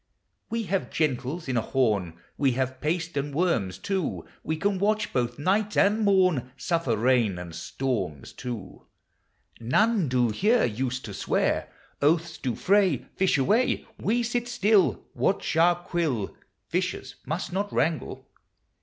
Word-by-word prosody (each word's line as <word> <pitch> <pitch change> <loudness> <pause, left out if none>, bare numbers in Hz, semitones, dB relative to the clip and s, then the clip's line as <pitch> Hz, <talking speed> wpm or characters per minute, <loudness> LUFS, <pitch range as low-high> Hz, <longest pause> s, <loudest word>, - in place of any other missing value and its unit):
We 230 0 -1
have 195 -1 -1
gentles 155 +2 -1
in 130 -2 0
a - - +3
horn, 105 -9 0 0.2
We 135 -3 +2
have 130 +1 -2
paste 165 +2 -1
and 140 0 -2
worms 145 - +1
too; 190 -5 -2 0.2
We 160 - -2
can 195 +3 0
watch 210 +2 +1
both 120 -1 0
night 200 +7 0
and 205 +2 +4
morn, 185 - +2
Suffer 135 -5 0
rain 115 -4 +2
and 90 -1 -7
storms 85 - -3
too; 120 -5 -7 0.7
None 190 - +2
do 125 -2 +2
here 215 - +3
Use 125 +3 -2
to 105 - -8
swear: - - 0 0.3
Oaths 160 +3 +2
do 125 -4 -2
fray 190 - +2
Fish 190 -5 +2
away; 210 - +2
We 240 +4 +1
sit 240 +1 -1
still, 215 -4 +2
Watch 195 -4 0
our 170 +2 +5
quill: 165 - -2 0.3
Fishers - - -2
must 170 +4 -3
not 200 +2 -1
wrangle. 160 +2 -1
160 Hz, 145 wpm, -26 LUFS, 125-195 Hz, 0.7 s, our